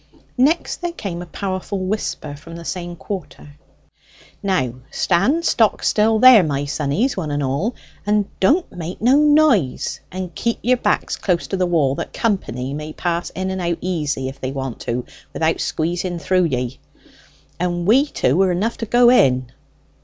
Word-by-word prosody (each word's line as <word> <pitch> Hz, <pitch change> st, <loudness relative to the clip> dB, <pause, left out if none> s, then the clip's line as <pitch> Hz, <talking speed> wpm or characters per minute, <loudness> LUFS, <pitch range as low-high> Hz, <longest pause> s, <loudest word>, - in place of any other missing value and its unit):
Next 300 Hz, +7 st, +2 dB
there 350 Hz, -1 st, -2 dB
came 185 Hz, -, -5 dB
a 175 Hz, -, -8 dB
powerful 190 Hz, +2 st, -4 dB
whisper 185 Hz, -7 st, -3 dB
from 165 Hz, +4 st, -11 dB
the 170 Hz, 0 st, -9 dB
same 175 Hz, -1 st, -4 dB
quarter: 180 Hz, -4 st, -7 dB, 0.9 s
"Now 180 Hz, -, 0 dB, 0.2 s
stand 255 Hz, -, +1 dB
stock 220 Hz, -3 st, +2 dB
still 220 Hz, +1 st, +3 dB
there, 250 Hz, -2 st, +8 dB
my 145 Hz, -4 st, -1 dB
sonnies, 150 Hz, -, 0 dB
one 165 Hz, -5 st, -3 dB
and 145 Hz, 0 st, -1 dB
all! 140 Hz, -, -1 dB, 0.3 s
And 210 Hz, 0 st, +2 dB
don't 310 Hz, -, +2 dB
make 175 Hz, +1 st, -6 dB
no 250 Hz, +5 st, +4 dB
noise; 295 Hz, -, +3 dB
and 185 Hz, -1 st, -5 dB
keep 235 Hz, +6 st, -1 dB
your 250 Hz, +2 st, +3 dB
backs 210 Hz, -3 st, 0 dB
close 175 Hz, -3 st, 0 dB
to 195 Hz, -, -1 dB
the 185 Hz, -1 st, +1 dB
wall, 155 Hz, -6 st, +2 dB
that -, -, -7 dB
company 135 Hz, -, -2 dB
may 150 Hz, +1 st, -6 dB
pass 175 Hz, -1 st, -2 dB
in 190 Hz, +1 st, -3 dB
and 190 Hz, 0 st, -3 dB
out 170 Hz, -1 st, -1 dB
easy 150 Hz, -7 st, -2 dB
if 135 Hz, +1 st, -8 dB
they 130 Hz, -, -3 dB
want 135 Hz, -3 st, -5 dB
to 120 Hz, +1 st, -3 dB, 0.3 s
without 160 Hz, 0 st, 0 dB
squeezing 175 Hz, +2 st, -2 dB
through 185 Hz, +1 st, +2 dB
ye: 125 Hz, -3 st, -2 dB, 0.8 s
and 175 Hz, -1 st, -1 dB
we 260 Hz, +9 st, +4 dB
two 165 Hz, -, +1 dB
are 190 Hz, -1 st, +3 dB
enough 205 Hz, +7 st, -1 dB
to 230 Hz, -, -3 dB
go 240 Hz, +2 st, +5 dB
in." 130 Hz, -, +3 dB
180 Hz, 170 wpm, -20 LUFS, 150-215 Hz, 0.9 s, there